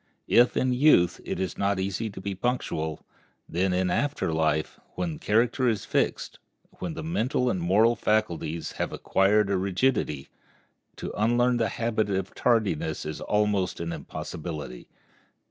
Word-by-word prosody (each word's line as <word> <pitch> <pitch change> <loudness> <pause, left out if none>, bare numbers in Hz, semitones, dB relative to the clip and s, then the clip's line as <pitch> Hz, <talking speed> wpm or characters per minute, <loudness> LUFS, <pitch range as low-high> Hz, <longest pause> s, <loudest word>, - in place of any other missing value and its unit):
If 120 +1 +4
in 130 -1 +2
youth 125 - +4
it - - -3
is 95 -1 -3
not 100 -1 +1
easy 100 +4 -2
to 100 - -9
be 100 +1 -3
punctual, 90 - -2 0.4
then 95 +3 0
in 90 0 +1
after 145 - 0
life, 80 -1 0 0.2
when 170 -2 -2
the 155 - -9
character 120 0 +2
is 110 -3 -2
fixed, - - -1 0.4
when 165 - -4
the - - -5
mental 125 -6 0
and 95 - -2
moral 105 +7 +4
faculties 85 -8 -1
have - - -1
acquired 100 +1 +2
a 100 - +2
rigidity, 95 - 0 0.7
to - - -6
unlearn 120 +3 +2
the 115 -3 +1
habit 115 -2 -1
of 95 -1 -2
tardiness 100 -10 0
is 75 0 -5
almost 105 -3 0
an 85 0 -3
impossibility. 75 -6 -7
100 Hz, 150 wpm, -27 LUFS, 90-120 Hz, 0.7 s, If